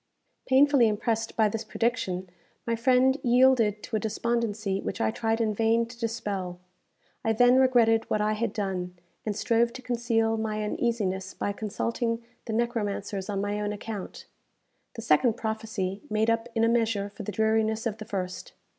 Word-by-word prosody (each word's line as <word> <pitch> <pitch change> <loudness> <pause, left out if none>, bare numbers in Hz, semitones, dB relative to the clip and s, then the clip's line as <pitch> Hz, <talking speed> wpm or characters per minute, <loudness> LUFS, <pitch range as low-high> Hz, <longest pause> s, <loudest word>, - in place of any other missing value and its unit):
Painfully 270 -2 +5
impressed 225 +1 -1
by 220 -1 +5
this 220 +2 -3
prediction, 215 -5 -1 0.4
my 230 - 0
friend 255 +3 +3
yielded 240 -4 +4
to 225 - -4
a - - +2
despondency 220 -3 -1
which 185 - -4
I - - +1
tried 225 0 -1
in 220 -2 +1
vain 225 +2 +2
to 235 +1 -13
dispel. 205 -6 -3 0.6
I 225 - +2
then 245 +3 +5
regretted 235 -4 +4
what 215 - +1
I 210 +1 +1
had 220 0 -1
done, 185 -4 -3 0.3
and 210 - -1
strove 235 +2 +2
to 260 - -8
conceal 230 -2 +1
my 215 -1 -2
uneasiness 205 -4 -1
by 205 - -2
consulting 230 +3 -2 0.2
the 225 - -4
necromancers 210 -4 -2
on 200 -1 -1
my 205 +1 -2
own 205 0 -1
account. 210 -1 -6 0.7
The - - -6
second 220 +10 +4
prophecy 220 -4 -3
made 220 +1 +2
up 230 +1 -1
in 225 - +2
a - - +5
measure 225 -3 +1
for 200 - -9
the 210 - -4
dreariness 220 +2 +1
of 220 -2 -2
the 215 - -6
first. 185 -3 -5
220 Hz, 170 wpm, -27 LUFS, 205-235 Hz, 0.7 s, Painfully